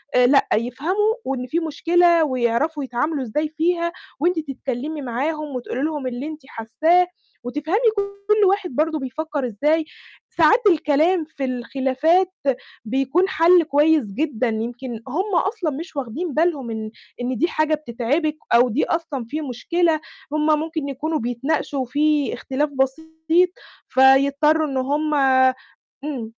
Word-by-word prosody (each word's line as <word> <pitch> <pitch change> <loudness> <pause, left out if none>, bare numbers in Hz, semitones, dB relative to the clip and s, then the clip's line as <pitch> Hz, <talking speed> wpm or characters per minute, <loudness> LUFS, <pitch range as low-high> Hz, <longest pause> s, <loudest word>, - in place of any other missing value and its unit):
آآ 250 0 +6
لأ، 275 +1 +4
يفهموا 320 - 0
وإن 255 -2 -3
في 325 +7 0
مشكلة 335 +1 +3
ويعرَفوا 260 +3 0
يتعاملوا 270 +3 -2
إزاي 300 +7 -2
فيها، 340 +1 +1 0.3
وأنتِ 340 +2 +1
تتكلمي 280 +1 -5
معاهم 285 +3 -3
وتقولي 250 +1 -4
لهم 300 -4 -2
اللي 250 +2 -4
أنتِ 310 0 -8
حاساه، 320 +10 +2 0.4
وتفهمي 300 - -1 0.2
كل 400 +1 +1
واحد 390 -1 +1
برضو 310 +1 +1
بيفكر 280 +1 -3
إزاي. 300 +8 +1 0.5
ساعات 345 +9 +5
الكلام 320 +1 +2
في 290 -3 -5
الخلافات 270 +8 +1 0.5
بيكون 270 - +1
حَل 340 +1 +5
كويس 300 -2 +3
جدًا، 255 +3 -2
يمكن 235 +1 -4
هُم 370 +8 -2
أصلًا 385 -4 0
مش 320 +4 -7
واخدين 275 +5 -4
بالهم 305 -7 0
إن 220 -1 -5 0.3
إن 250 -1 -2
دي 335 - +2
حاجة 310 -2 +1
بتتعبِك 295 +3 -2 0.2
أو 245 +1 +5
دي 240 +6 0
أصلًا 315 -7 -3
في 310 +3 -3
مشكلة، 315 +5 0 0.3
هُم 305 0 +1
ممكن 315 -3 -4
يكونوا 305 +4 -2
بيتناقشوا، 265 +3 -2
في 295 +2 +1
اختلاف 290 +3 -2
بسيط، 320 +6 0 0.4
فيضطروا 280 +4 +4
إن 270 -1 -3
هُم 295 +4 0 0.9
إمم. 255 -7 -5
300 Hz, 135 wpm, -21 LUFS, 260-325 Hz, 0.9 s, آآ